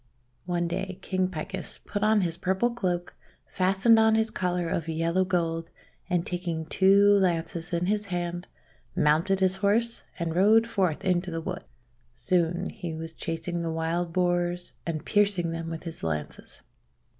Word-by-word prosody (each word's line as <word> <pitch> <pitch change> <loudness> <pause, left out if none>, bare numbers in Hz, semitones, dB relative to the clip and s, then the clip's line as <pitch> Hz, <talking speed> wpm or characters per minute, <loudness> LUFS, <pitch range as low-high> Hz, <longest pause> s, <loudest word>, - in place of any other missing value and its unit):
One 175 -1 0
day 185 +2 -3
King 185 -1 0
Picus 185 +2 -5
put 205 - -3
on 215 0 +4
his 170 -3 -1
purple 190 +6 0
cloak, 180 -7 -2 0.3
fastened 195 +5 +3
on 220 0 +5
his 220 0 +1
collar 180 -3 -1
of 165 -1 -2
yellow 165 +3 +1
gold, 165 -3 -1 0.4
and 175 -2 +1
taking 175 -3 -3
two 195 +4 +4
lances 170 -1 -1
in 170 0 0
his 210 +2 0
hand, 175 -2 -3 0.5
mounted 165 +6 +2
his 190 0 +2
horse, 230 +3 +1 0.2
and 170 -1 -2
rode 215 +5 +5
forth 185 -8 -1
into 180 0 +1
the 165 -1 -3
wood. 180 +1 -5 0.5
Soon 175 +1 0
he 175 -5 -6
was 160 0 -6
chasing 170 +1 -3
the 165 - -2
Wild 165 +2 -1
Boars 175 0 0
and 160 -2 -3
piercing 200 -5 +2
them 165 0 -4
with 165 -1 -6
his 165 -2 -7
lances. 75 -2 -5
175 Hz, 155 wpm, -27 LUFS, 165-190 Hz, 0.5 s, on